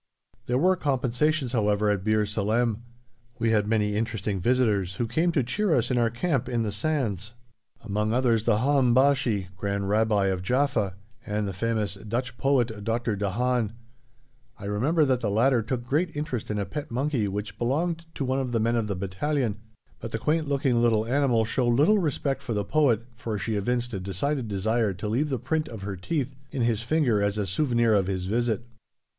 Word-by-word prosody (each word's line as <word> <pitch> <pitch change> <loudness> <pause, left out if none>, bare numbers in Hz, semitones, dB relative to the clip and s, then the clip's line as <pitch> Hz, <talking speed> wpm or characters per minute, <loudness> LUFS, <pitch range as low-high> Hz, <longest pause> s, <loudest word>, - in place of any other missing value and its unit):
There 125 - +1
were 185 +7 +4
compensations, 140 -1 0
however, 105 -3 +2
at 100 -2 -1
Bir 110 0 +2
Salem. 110 +2 0 0.6
We 115 -2 +1
had 105 -2 +2
many 105 -2 +1
interesting 105 -3 -2
visitors 105 -4 +1
who 120 - -1
came 160 +10 +1
to 140 - +2
cheer 170 - +1
us 120 +1 +1
in 125 - +2
our 115 -1 +3
camp 135 +3 -1
in 120 -1 0
the 105 - -2
sands, 110 - -2 0.5
among 105 0 -1
others 120 -2 +2
the 115 -3 +3
Haham 130 -1 +3
Bashi 125 -8 +2
(Grand 100 0 -2
Rabbi 105 -1 +2
of 95 -2 0
Jaffa) 125 -3 0 0.3
and 105 0 -2
the 100 - -4
famous 110 +1 -1
Dutch 115 +5 -4
poet 120 -6 +1
Dr. 115 0 -1
de 100 0 -1
Haan. 120 +1 0 0.8
I 100 - -9
remember 135 +11 +2
that 130 -2 +1
the 110 - 0
latter 120 +4 +3
took 120 +2 -3
great 155 +6 0
interest 145 -6 -3
in 105 - -1
a 100 - -1
pet 150 +4 -6
monkey 130 -2 0
which 100 +1 -5
belonged 165 +7 -1
to 135 - -2
one 130 +1 0
of 130 -2 -3
the 115 - +2
men 115 +2 +1
of 115 -2 0
the 100 - -2
battalion, 105 +5 -1 0.4
but 115 - -7
the 115 - -1
quaint 155 +6 0
looking 135 -4 +2
little 110 -2 +3
animal 125 -3 +2
showed 120 +1 +1
little 170 - +4
respect 145 -4 -1
for 115 - -3
the 105 -2 -1
poet, 120 -3 +2
for 115 -2 -4
she 110 +2 -2
evinced 120 +4 -1
a 95 - -2
decided 115 - -2
desire 105 +1 0
to 100 +3 -5
leave 130 +8 0
the 135 - 0
print 155 +6 -1
of 110 -4 -8
her 100 -1 -4
teeth 135 - -2 0.2
in 135 -4 -2
his 115 -2 +1
finger 120 -5 +2
as 100 +1 0
a 105 - 0
souvenir 120 - +2
of 100 -3 +2
his 95 -2 -2
visit. 120 +3 0
115 Hz, 195 wpm, -26 LUFS, 105-135 Hz, 0.8 s, were